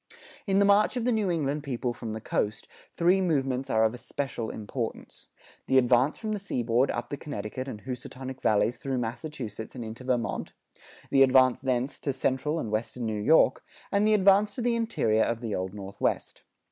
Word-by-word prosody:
In 195 0 +2
the 200 - +5
march 205 +5 +4
of 240 - -1
the 250 - +3
New 215 -4 +1
England 150 -3 -1
people 125 -3 -2
from 115 -2 -6
the 110 - -4
coast, 105 0 -2 0.3
three 180 +3 +4
movements 135 -6 0
are 110 -2 +3
of 110 0 +2
especial 125 -2 -4
importance: 110 +2 -6 0.4
the 130 - +4
advance 130 +3 +4
from 220 -1 -4
the 210 - -1
seaboard 125 - +1
up 120 0 -3
the 145 - -4
Connecticut 130 -2 -5
and 105 -5 -7
Housatonic 130 +1 -7
Valleys 110 +3 +2
through 135 -2 -3
Massachusetts 120 -2 -5
and 120 -3 -5
into 110 +3 -8
Vermont; 125 -2 -2 0.6
the 135 - +5
advance 130 -1 +5
thence 130 +1 -1
to 140 - -2
central 135 +4 0
and 110 - -4
western 115 +2 -2
New 110 -2 -2
York; 160 +10 +4 0.3
and 200 +1 +3
the 215 - +5
advance 200 +1 +4
to - - -3
the 240 -1 +2
interior 170 - +1
of 115 0 0
the 115 -3 -4
Old 95 0 -2
Northwest. 100 -1 -3
130 Hz, 185 wpm, -28 LUFS, 115-155 Hz, 0.6 s, the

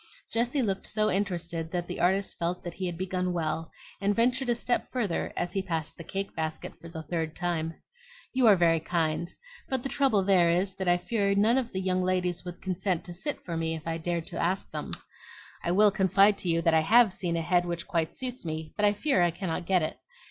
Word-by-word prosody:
Jessie 245 +4 +1
looked 195 -3 -2
so 215 0 +1
interested 175 -4 -1
that 175 0 -2
the - - -5
artist 190 +3 +1
felt 175 +1 -2
that 175 - -5
he 185 - -3
had 175 -1 -4
begun 185 0 -1
well, 160 -1 -2 0.3
and 200 +1 +2
ventured 250 +2 +2
a 240 - +3
step 240 +1 -1
further 215 -9 -1
as 175 - -2
he 195 - 0
passed 165 -5 -3
the 165 - -9
cake 195 +4 -4
basket 160 -1 -4
for 170 - -9
the 160 -1 -7
third 160 0 -3
time. 165 -2 -2 0.6
"You 255 -2 +4
are 210 - +8
very 165 -2 +3
kind; 165 0 -1 0.4
but 260 -2 -1
the 270 - -2
trouble 265 -10 +2
there 185 -3 +4
is, 185 +3 +1
that 190 - -3
I 175 0 +5
fear 200 +2 0
none 220 +6 +4
of 245 -3 -4
the 190 - -2
young 185 0 +1
ladies 180 -1 0
would 180 -1 -8
consent 185 -1 -1
to 175 - -7
sit 285 - -3
to 170 - -4
me 165 0 -1
if 160 - -8
I 165 0 -2
dared 170 0 -2
to - - -5
ask 185 +3 0
them. - - -5 0.7
I - - -1
will 205 +4 +5
confide 195 +1 +4
to 180 - -2
you 165 0 +2
that 165 - +4
I 160 - +5
HAVE 220 +4 +5
seen 170 -3 -2
a - - 0
head 175 +1 +2
which 170 0 -3
quite 165 -3 0
suits 255 -1 -4
me; 160 -1 -5
but 210 - +2
I 205 - +4
fear 240 -2 +1
I 175 - +4
cannot 170 0 -4
get 185 -3 +3
it. 155 - -4
180 Hz, 235 wpm, -28 LUFS, 170-200 Hz, 0.7 s, are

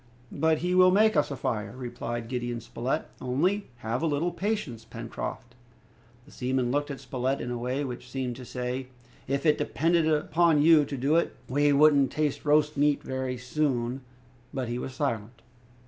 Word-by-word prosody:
"But 160 +2 +2
he 180 - +1
will 185 0 +7
make 215 +4 +4
us 150 - +2
a 140 - -3
fire!" 105 -3 -3
replied 120 -2 -5
Gideon 120 -1 -3
Spilett, 120 +2 -3 0.2
"only 175 +11 0 0.2
have 115 +3 -1
a 165 - +1
little 155 +4 0
patience, 175 - -3
Pencroft!" 115 +1 -6 0.7
The - - -17
seaman 125 -1 -1
looked 145 +2 0
at 140 - -5
Spilett 130 +1 -2
in 120 - -4
a 120 - -2
way 125 +4 -1
which 125 -2 -6
seemed 125 -2 -3
to 130 - -9
say, 125 +1 -4 0.4
"If 140 +3 -1
it 150 - +4
depended 165 +1 +1
upon 155 +1 +3
you 160 -2 +6
to 140 0 -5
do 140 +6 +2
it, 170 - 0
we 145 +3 +3
wouldn't 140 -2 +5
taste 150 -2 -1
roast 150 0 +3
meat 145 0 +2
very 130 -1 -3
soon"; 125 -1 -1 0.5
but 130 -3 -3
he 120 +1 -2
was 130 0 -6
silent. 120 -5 -3
135 Hz, 180 wpm, -28 LUFS, 125-150 Hz, 0.7 s, will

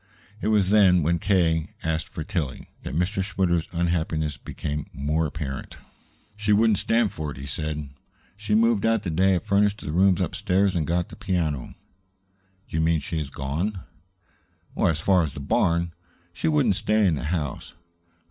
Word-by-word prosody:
It - - -1
was 105 -3 +3
then, 95 -5 +5
when 85 +3 +1
K. 85 -4 +1
asked 80 0 -1
for 80 - -5
Tillie, 75 -5 -3
that 65 - -6
Mr. 95 +4 0
Schwitter's 90 -4 0
unhappiness 85 -3 -1
became 75 -1 -5
more 75 +3 0
apparent. 70 -3 -6 0.6
"She 105 0 -1
wouldn't 110 -1 +4
stand 115 -2 +2
for 75 -1 -5
it," 70 - -8
he 70 - -7
said. 75 +1 -4 0.5
"She 105 +1 -1
moved 115 -2 +3
out 115 -2 +2
the 90 - -2
day 95 +4 +3
I - - +2
furnished 100 +1 +1
the 75 - -5
rooms 90 +2 +4
upstairs 95 +1 +1
and 80 -4 0
got 85 +1 0
the - - -10
piano." 85 - -2 0.9
"Do - - -8
you - - +2
mean 80 0 +2
she 80 +3 -3
has 75 -3 -4
gone?" 80 +9 -3 0.9
"As 80 -2 +2
far 90 +2 +3
as 75 -6 -3
the - - -6
barn. 85 +4 +1 0.4
She 90 - -2
wouldn't 140 - +3
stay 105 0 +2
in 90 - +3
the 75 - -3
house. 75 -3 -3
85 Hz, 175 wpm, -25 LUFS, 80-100 Hz, 0.9 s, then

